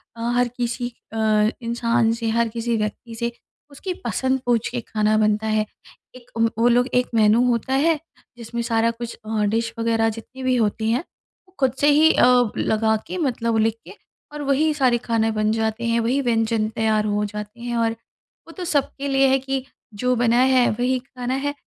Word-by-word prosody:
अ, 230 - -9
हर 245 0 +3
किसी 245 0 -2 0.2
अ, 215 -1 +2
इंसान 235 0 +1
से 230 -1 -2
हर 230 +1 +1
किसी 230 +1 -2
व्यक्ति 215 +2 -4
से 235 +1 -2 0.4
उसकी 365 +7 -5
पसंद 260 +3 0
पूँछ 240 -2 +1
के 245 - -3
खाना 215 -1 0
बनता 215 0 +1
है। 215 0 +1 0.5
एक 250 -1 -15
व 230 0 +3
वो 230 +1 +3
लोग 245 +1 +3
एक 250 0 +2
मेन्यू 220 +1 +4
होता 240 +2 0
है, 310 +3 +2 0.4
जिसमें 235 0 -5
सारा 230 0 +1
कुछ 235 0 -7
अ, 215 -1 -1
डिश 230 +2 -1
वग़ैरह 225 -1 +2
जितनी 230 +4 -9
भी 255 0 +2
होती 220 -1 0
हैं 245 +7 0 0.4
वो 375 - -28
खुद 265 -3 +2
से 290 - +3
ही 310 +2 +6
अ, 245 -2 +4
लगा 220 0 +1
के - - -5
मतलब 230 -8 0
लिख 220 0 +2
के - - -10 0.4
और 295 - -6
वही 285 +3 +2
सारे 260 -5 +2
खाने 225 -2 0
बन 215 0 0
जाते 220 +1 -1
हैं 230 0 +1
वही 240 +4 +1
व्यंजन 225 -3 +1
तैयार 220 -1 +1
हो 210 0 0
जाते 210 +2 -7
हैं। 240 0 -3
और 230 -1 +2 0.6
वो - - -11
तो 365 - -4
सबके 280 -3 -1
लिए 270 0 +3
है 265 0 +3
कि 270 0 -3 0.3
जो 250 +5 0
बनाया 240 +1 +3 0.2
है 245 - +4
वही 250 +3 0
खाना 250 -1 -5
है। 285 +2 -1
235 Hz, 195 wpm, -22 LUFS, 220-255 Hz, 0.6 s, ही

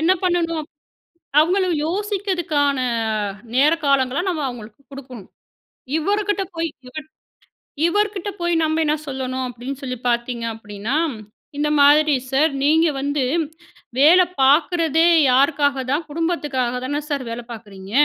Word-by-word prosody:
என்ன 335 +4 +4
பண்ணணும், 335 -3 0 0.7
அவங்களும் 360 +2 +2
யோசிக்கிறதுக்கான 355 -7 -1 0.8
நேர 285 +4 +5
காலங்களை 275 +1 +2
நம்ம 320 -4 -2
அவங்களுக்கு 230 0 -9
குடுக்கணும். 255 -7 -10 0.7
இவருகிட்ட 405 +3 0
போய், 330 0 -1 0.2
இவர் 310 +3 -8 0.8
இவர்கிட்ட 415 +1 -1
போய் 345 0 0
நம்ம 315 +1 0
என்ன 300 - +2
சொல்லணும் 260 -1 -3
அப்படீன்னு 255 +4 -7
சொல்லி 255 -2 -4
பார்த்தீங்க 235 0 -2
அப்படீன்னா, 210 +3 -5 0.6
"இந்த 300 +1 0
மாதிரி 295 +1 +5 0.2
சார்! 295 +4 +3
நீங்க 320 +3 +4
வந்து 285 -1 -1 0.8
வேலை 350 +6 +7 0.2
பார்க்குறதே 325 +3 +3 0.3
யாருக்காக 280 0 +2
தான்? 305 +3 0
குடும்பத்துக்காக 290 -7 -2
தான 290 +2 -2
சார் 280 -3 -2
வேலை 235 +1 -5
பார்க்குறீங்க. 205 -4 -10
290 Hz, 115 wpm, -21 LUFS, 260-335 Hz, 0.8 s, வேலை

